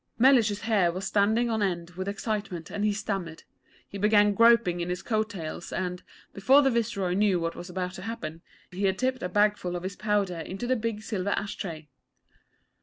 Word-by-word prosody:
Mellish's 230 -5 +4
hair 210 -6 +2
was 185 +3 -5
standing 220 +4 +2
on 220 -1 0
end 175 -3 -1
with 185 +2 -6
excitement, 200 -4 -4
and 205 - -3
he 210 - +3
stammered. 195 -5 -4 0.4
He 200 - -8
began 210 0 +4
groping 230 -5 +4
in 170 - -3
his 180 +1 -3
coat 215 0 0
tails 170 -4 -6
and, 180 -1 -3 0.3
before 265 +9 +5
the 270 - +3
Viceroy 215 -6 0
knew 195 -2 +2
what 165 0 -2
was 175 - -8
about 180 0 -3
to 185 - -8
happen, 165 -7 -6 0.3
he 190 +2 -2
had 190 -1 +1
tipped 255 +1 -1
a 180 - -2
bagful 205 -3 +1
of 175 - -5
his 190 +1 -4
powder 205 -5 0
into 190 +7 -5
the 255 +1 +2
big 225 -2 -3
silver 200 -3 -2
ash 200 0 -1
tray. 160 -5 -6
200 Hz, 195 wpm, -27 LUFS, 180-220 Hz, 0.4 s, before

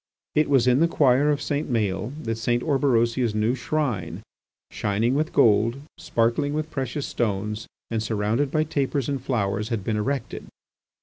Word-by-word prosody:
It 150 -1 +2
was 135 -4 +4
in 125 +1 +4
the 165 - +4
choir 145 -2 +3
of 145 -1 0
St. 145 -1 -2
Maël's 110 0 -1
that 115 0 -2
St. 120 +1 0
Orberosia's 120 -5 +1
new 110 +3 +2
shrine, 130 - -2 0.5
shining 110 +4 0
with 155 +4 0
gold, 115 +3 +3 0.2
sparkling 120 +5 0
with 155 +1 -3
precious 135 +1 -3
stones, 105 -1 -2 0.2
and 115 -1 0
surrounded 110 +5 0
by 155 +3 +1
tapers 140 -4 -1
and 140 -2 -2
flowers, 110 -4 -1
had 115 -5 -2
been 110 +1 -1
erected. 130 +3 -3
120 Hz, 160 wpm, -24 LUFS, 110-140 Hz, 0.5 s, was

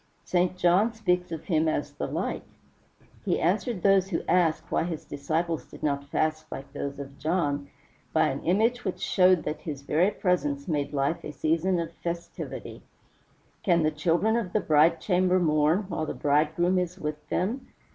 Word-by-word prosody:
St. 180 0 +1
John 185 +6 +3
speaks 180 -5 0
of 165 -1 -5
him 160 -2 +1
as 155 -2 -1
"LIGHT." - - -2 0.8
He - - 0
answered 195 +3 0
those 195 -1 +4
who 170 - -2
asked 165 -2 +2
why - - +2
his 165 -3 -5
disciples 160 +3 -2
did - - -13
not 140 -2 0
fast 155 +1 -1
like 135 +1 -8
those 140 0 -4
of 140 -1 -9
John, 145 -4 -1 0.4
by 160 - +3
an 135 0 -3
image 225 +8 +2
which 190 - -3
showed 185 -2 +4
that 155 - -4
his 145 -4 -6
very 165 +7 +2
presence 150 -9 -1
made 145 -4 -1
life 140 +3 -1
a - - -5
season 165 +4 +1
of 165 0 -4
festivity: 170 0 -6 0.8
"Can 170 -3 +3
the 155 - +2
children 170 +8 +1
of 200 -7 -3
the 215 - +3
bride 160 -1 +4
chamber 185 -1 +2
mourn 155 +3 +2
while 170 -5 -3
the - - -4
bridegroom 160 +5 +2
is 180 0 -3
with 150 -3 -5
them?" 240 +8 -1
165 Hz, 170 wpm, -27 LUFS, 150-180 Hz, 0.8 s, those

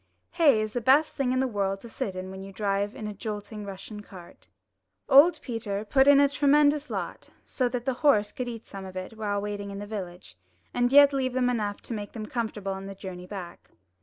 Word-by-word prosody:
Hay 295 -10 +4
is 215 0 -3
the 245 - -1
best 275 +6 +4
thing 270 -3 0
in 255 - +1
the 265 - +1
world 195 -4 -1
to - - -10
sit 195 -4 -4
in 185 0 -6
when 190 0 -8
you 195 - -9
drive 200 +1 -1
in 215 - -6
a 210 - -4
jolting 210 0 -6
Russian 205 +2 -8
cart. 185 -4 -14 0.6
Old 290 +6 +7
Peter 215 -4 -4
put 265 +5 +4
in 285 -1 +8
a 285 - +6
tremendous 290 +1 +3
lot, - - -5 0.2
so 255 -2 -1
that 240 0 -4
the 265 - +1
horse 215 -9 +4
could 250 - -5
eat 230 -2 -7
some 195 -1 -8
of 190 -1 -9
it 185 +3 -6
while 205 -2 -2
waiting 205 0 -4
in 200 - -6
the 205 - -6
village, 185 - -7 0.4
and 245 0 +1
yet 285 0 +8
leave 260 -2 0
them 250 -1 +2
enough 210 -4 -2
to - - -7
make 205 -2 -6
them 220 -2 -5
comfortable 215 -4 -3
on 190 0 -7
the 195 - -7
journey 180 -2 -8
back. 180 -3 -9
215 Hz, 225 wpm, -27 LUFS, 200-255 Hz, 0.6 s, in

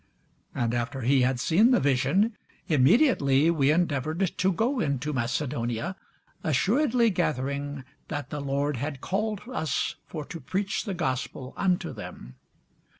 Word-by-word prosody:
And 120 -1 0
after 125 +3 -2
he 130 +3 +3
had 125 0 +1
seen 190 - +4
the 250 - +4
vision, 145 - +2 0.3
immediately 150 - +4
we 145 -4 +2
endeavoured 160 +2 0
to 190 +1 +3
go 240 +8 0
into 145 - -1
Macedonia, 120 +2 -2 0.5
assuredly 230 - +2
gathering 140 -4 -2 0.2
that 145 -2 -5
the 150 -1 -3
Lord 140 0 -1
had 140 +2 -4
called 210 +5 -2
us 155 - -1
for 155 -3 -6
to 165 - -7
preach 195 - -2
the 200 -4 -3
gospel 130 -4 -3
unto 185 -2 0
them. 60 - -9
145 Hz, 135 wpm, -27 LUFS, 130-190 Hz, 0.5 s, seen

